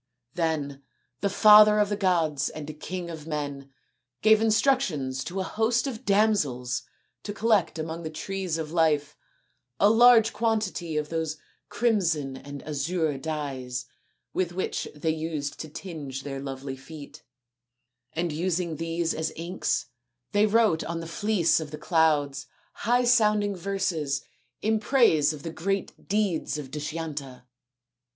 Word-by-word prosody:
Then 150 Hz, -5 st, -2 dB, 0.4 s
the 200 Hz, -, 0 dB
father 210 Hz, +1 st, +8 dB
of 210 Hz, -1 st, +3 dB
the 205 Hz, -, 0 dB
gods 170 Hz, -8 st, +1 dB
and 155 Hz, 0 st, -8 dB
king 180 Hz, 0 st, -5 dB
of 160 Hz, -1 st, -9 dB
men 145 Hz, -3 st, -4 dB, 0.5 s
gave 220 Hz, 0 st, +6 dB
instructions 210 Hz, -, +1 dB
to 185 Hz, +2 st, -4 dB
a -, -, 0 dB
host 225 Hz, +4 st, +1 dB
of 250 Hz, -5 st, -5 dB
damsels 195 Hz, -, +1 dB, 0.4 s
to 205 Hz, -, -5 dB
collect 210 Hz, -5 st, +1 dB
among 160 Hz, +1 st, -4 dB
the 160 Hz, -, -5 dB
trees 185 Hz, +1 st, -3 dB
of 155 Hz, -1 st, -5 dB
life 150 Hz, -3 st, +2 dB, 0.6 s
a 205 Hz, -, +6 dB
large 230 Hz, -1 st, +6 dB
quantity 210 Hz, -8 st, -1 dB
of 150 Hz, 0 st, -2 dB
those 160 Hz, -1 st, -2 dB, 0.3 s
crimson 170 Hz, -, +1 dB
and 140 Hz, +1 st, -9 dB
azure 155 Hz, +1 st, -1 dB
dyes 135 Hz, -5 st, -4 dB, 0.5 s
with 175 Hz, -2 st, -1 dB
which 185 Hz, -, -2 dB
they 160 Hz, +2 st, 0 dB
used 155 Hz, -3 st, -4 dB
to 155 Hz, -, -6 dB
tinge 150 Hz, -5 st, -7 dB
their 135 Hz, -1 st, -5 dB
lovely 135 Hz, 0 st, -5 dB
feet; 140 Hz, +2 st, -11 dB, 0.9 s
and 170 Hz, 0 st, -1 dB
using 170 Hz, 0 st, -1 dB
these 165 Hz, 0 st, -1 dB
as 160 Hz, 0 st, -2 dB
inks 170 Hz, -4 st, -2 dB, 0.5 s
they 205 Hz, +1 st, +4 dB
wrote 215 Hz, -6 st, +3 dB
on 170 Hz, 0 st, -4 dB
the 165 Hz, -, -6 dB
fleece 175 Hz, -2 st, +2 dB
of 155 Hz, -2 st, -6 dB
the 150 Hz, -, -7 dB
clouds 150 Hz, -5 st, +1 dB, 0.3 s
high 245 Hz, +3 st, +1 dB
sounding 210 Hz, -4 st, +3 dB
verses 170 Hz, -7 st, -2 dB, 0.4 s
in 220 Hz, 0 st, +2 dB
praise 210 Hz, -, +4 dB
of 150 Hz, -2 st, -9 dB
the 165 Hz, -, -5 dB
great 195 Hz, +3 st, -3 dB
deeds 200 Hz, -7 st, 0 dB
of 140 Hz, -3 st, -7 dB
Dushyanta. 150 Hz, -4 st, -5 dB
165 Hz, 140 wpm, -27 LUFS, 150-205 Hz, 0.9 s, father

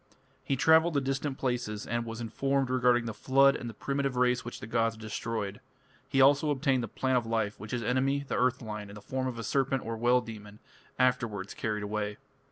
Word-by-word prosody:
He 135 Hz, +1 st, 0 dB
travelled 160 Hz, +5 st, +4 dB
to -, -, +4 dB
distant 135 Hz, 0 st, -2 dB
places, 120 Hz, -5 st, -2 dB
and 120 Hz, 0 st, -2 dB
was 115 Hz, 0 st, -6 dB
informed 135 Hz, +3 st, 0 dB
regarding 125 Hz, -2 st, +3 dB
the 115 Hz, -, -3 dB
flood 135 Hz, +5 st, +4 dB
and 120 Hz, -, -5 dB
the -, -, -8 dB
primitive 140 Hz, 0 st, -2 dB
race 125 Hz, 0 st, +2 dB
which 120 Hz, -, -7 dB
the -, -, -7 dB
gods 115 Hz, 0 st, 0 dB
destroyed; 110 Hz, -2 st, -4 dB, 0.5 s
he 135 Hz, -, +1 dB
also 140 Hz, +3 st, +5 dB
obtained 135 Hz, -2 st, +1 dB
the 115 Hz, -, -3 dB
plant 130 Hz, +4 st, +1 dB
of 115 Hz, -, -8 dB
life, 110 Hz, -2 st, -1 dB
which 105 Hz, +2 st, -8 dB
his 120 Hz, 0 st, -2 dB
enemy, 135 Hz, +4 st, +1 dB
the -, -, -2 dB
earth 125 Hz, 0 st, +1 dB
lion, 105 Hz, -2 st, -6 dB
in 100 Hz, -, -10 dB
the -, -, -8 dB
form 130 Hz, +2 st, -2 dB
of 125 Hz, -2 st, -4 dB
a 115 Hz, -, -4 dB
serpent 135 Hz, +4 st, 0 dB
or 115 Hz, 0 st, -3 dB
well 120 Hz, +2 st, +3 dB
demon, 105 Hz, -3 st, -9 dB, 0.4 s
afterwards 120 Hz, -6 st, 0 dB
carried 105 Hz, -1 st, -2 dB
away. 105 Hz, 0 st, -3 dB
125 Hz, 210 wpm, -30 LUFS, 110-135 Hz, 0.5 s, also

